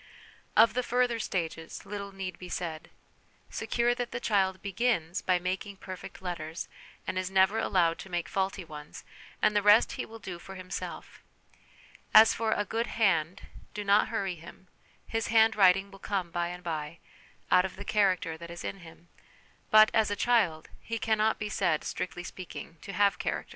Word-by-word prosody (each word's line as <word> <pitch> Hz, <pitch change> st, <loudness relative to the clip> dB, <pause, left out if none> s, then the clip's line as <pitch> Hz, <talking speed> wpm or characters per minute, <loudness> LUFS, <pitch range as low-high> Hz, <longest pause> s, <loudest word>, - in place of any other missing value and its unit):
Of 225 Hz, +1 st, +7 dB
the 250 Hz, -, +1 dB
further 245 Hz, -1 st, +1 dB
stages, 165 Hz, -5 st, -4 dB
little 200 Hz, -1 st, -6 dB
need 190 Hz, -2 st, -6 dB
be 180 Hz, -, -8 dB
said. 165 Hz, -3 st, -4 dB, 0.6 s
Secure 240 Hz, 0 st, +1 dB
that 245 Hz, 0 st, -3 dB
the -, -, -4 dB
child 190 Hz, -5 st, +1 dB
begins 195 Hz, -4 st, 0 dB
by 185 Hz, -1 st, +2 dB
making 185 Hz, +2 st, -4 dB
perfect 185 Hz, 0 st, -9 dB
letters 165 Hz, -2 st, -4 dB, 0.4 s
and 185 Hz, -, -2 dB
is 185 Hz, 0 st, -2 dB
never 190 Hz, +3 st, +3 dB
allowed 170 Hz, -3 st, +2 dB
to 190 Hz, -, -9 dB
make 175 Hz, -2 st, -2 dB
faulty 190 Hz, -1 st, -2 dB
ones, 150 Hz, -2 st, -10 dB, 0.4 s
and 210 Hz, -, +4 dB
the 205 Hz, -, +4 dB
rest 210 Hz, +3 st, +6 dB
he -, -, -4 dB
will 225 Hz, -, -10 dB
do 185 Hz, -5 st, -7 dB
for 190 Hz, +2 st, -10 dB
himself; 185 Hz, 0 st, -7 dB, 0.9 s
as 220 Hz, +1 st, +9 dB
for 225 Hz, -1 st, -1 dB
'a 205 Hz, -, +1 dB
good 230 Hz, +4 st, -1 dB
hand,' 185 Hz, -6 st, +1 dB, 0.3 s
do 210 Hz, -, -3 dB
not 200 Hz, +1 st, +4 dB
hurry 200 Hz, -5 st, -2 dB
him; 175 Hz, +2 st, -13 dB, 0.4 s
his 225 Hz, -1 st, -2 dB
'handwriting' 200 Hz, -4 st, +4 dB
will 195 Hz, -, -13 dB
come 190 Hz, -4 st, -2 dB
by 175 Hz, 0 st, -1 dB
and 180 Hz, +1 st, -7 dB
by, 160 Hz, -2 st, -4 dB, 0.5 s
out 180 Hz, -, +6 dB
of 190 Hz, -, -5 dB
the 205 Hz, -, -8 dB
character 185 Hz, -6 st, +1 dB
that 170 Hz, 0 st, -9 dB
is 170 Hz, 0 st, -8 dB
in 195 Hz, -, -5 dB
him; 170 Hz, 0 st, -15 dB, 0.6 s
but, 215 Hz, 0 st, +7 dB
as 220 Hz, -2 st, +3 dB
a 205 Hz, -, -1 dB
child, 200 Hz, -9 st, +2 dB
he 230 Hz, -, -4 dB
cannot 220 Hz, 0 st, +1 dB
be 210 Hz, -, -3 dB
said, 175 Hz, -7 st, 0 dB
strictly 175 Hz, -1 st, -4 dB
speaking, 175 Hz, -2 st, -8 dB
to 200 Hz, -, -7 dB
have 200 Hz, +1 st, +3 dB
character. -, -, -2 dB
190 Hz, 180 wpm, -29 LUFS, 175-215 Hz, 0.9 s, as